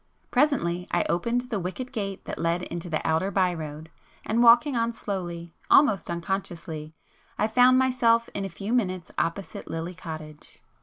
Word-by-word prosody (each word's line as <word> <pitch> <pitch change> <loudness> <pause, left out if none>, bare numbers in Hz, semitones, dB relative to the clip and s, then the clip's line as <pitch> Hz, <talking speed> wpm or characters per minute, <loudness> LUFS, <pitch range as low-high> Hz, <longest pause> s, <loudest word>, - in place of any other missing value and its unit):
Presently 180 - +1
I - - +1
opened 235 +8 +1
the 245 -4 -3
wicket 190 +9 -5
gate 200 -6 -4
that - - -5
led 170 +2 0
into 175 0 -5
the 155 - -2
outer 160 +4 +1
by 185 -2 +2
road, 155 0 -7 0.3
and 225 +2 +1
walking 240 +4 +6
on 230 0 0
slowly, 175 -6 -5 0.2
almost 215 - +5
unconsciously, 170 -3 -4 0.4
I 215 - +2
found 250 +3 +5
myself 245 -3 +3
in 200 - -3
a 195 - -3
few 200 +6 -4
minutes 185 -7 -1
opposite 175 +4 -3
'Lily 165 +2 -4
Cottage. 155 -4 -9
190 Hz, 160 wpm, -26 LUFS, 170-235 Hz, 0.4 s, walking